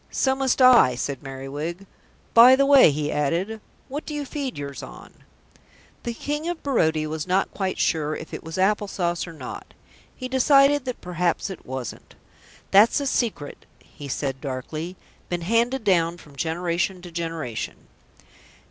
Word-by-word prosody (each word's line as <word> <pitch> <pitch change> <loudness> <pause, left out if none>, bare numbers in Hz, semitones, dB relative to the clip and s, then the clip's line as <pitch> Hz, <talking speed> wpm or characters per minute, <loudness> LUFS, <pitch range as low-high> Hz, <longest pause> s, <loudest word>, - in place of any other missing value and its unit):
"So 265 - +1
must 265 -1 +1
I," 240 - +7
said 135 +2 -4
Merriwig. 145 +7 -6 0.5
"By 245 +3 +9
the 275 +1 +3
way," 275 - +7
he 150 0 -2
added, 175 +10 -1 0.3
"what 290 +3 -5
do 300 - -6
you 290 -1 -3
feed 275 -2 -4
yours 140 -1 -6
on?" - - -11 0.9
The 235 -1 -4
King 295 +6 -3
of 350 -2 -5
Barodia 160 - +1
was 155 +1 -4
not 190 +1 +1
quite 190 -2 -2
sure 155 -2 0
if 160 - -9
it - - -6
was 160 +2 -7
apple 205 +2 +2
sauce 175 -3 -2
or 165 - -9
not. 160 - -9 0.4
He 255 - -5
decided 275 +2 +4
that 250 -1 -5
perhaps 180 +2 -1
it 190 - -10
wasn't. 130 -2 -7 0.6
"That's 210 +8 +6
a 285 - -3
secret," 230 - -2
he 145 - -12
said 135 0 -3
darkly. 155 +6 -5 0.3
"Been 175 -1 -2
handed 230 +7 +1
down 175 -4 +2
from 145 -4 -16
generation 175 +4 -2
to 175 - -9
generation." 165 -8 -4
180 Hz, 160 wpm, -24 LUFS, 155-250 Hz, 0.9 s, By